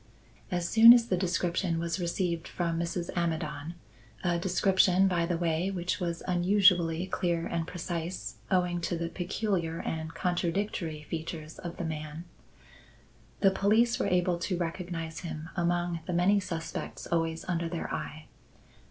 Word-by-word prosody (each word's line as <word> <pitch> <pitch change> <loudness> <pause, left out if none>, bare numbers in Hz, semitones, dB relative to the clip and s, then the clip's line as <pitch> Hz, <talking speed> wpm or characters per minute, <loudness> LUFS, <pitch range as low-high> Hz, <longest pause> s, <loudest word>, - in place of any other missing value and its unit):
As 175 -3 -1
soon 230 +3 +10
as 240 -1 +4
the 185 - +3
description 180 -1 0
was 170 +2 -2
received 170 -1 -1
from 170 -2 -2
Mrs. 170 +1 -2
Amidon 160 -2 -2 0.5
(a 175 -2 +1
description, 190 +1 +3
by 170 -3 +1
the 175 -1 0
way, 170 +2 0
which 180 -1 -2
was 170 -2 -3
unusually 180 -2 +4
clear 175 -2 -1
and 165 -1 -2
precise, 175 0 -4
owing 180 -2 +1
to 170 0 -1
the 165 0 -2
peculiar 175 -2 -2
and 160 0 -4
contradictory 175 -3 -1
features 160 0 -6
of 175 -1 -6
the 175 - -3
man), 155 0 -5 1.2
the 195 - +6
police 220 +5 +3
were - - +1
able 180 -1 +2
to 180 0 -1
recognize 165 -1 -4
him 160 -2 -6
among 175 -1 0
the 180 - -2
many 185 +4 +4
suspects 165 -4 -5
always 165 -1 -1
under 170 -2 -1
their 170 -1 -4
eye. 155 0 -5
175 Hz, 145 wpm, -29 LUFS, 165-185 Hz, 1.2 s, soon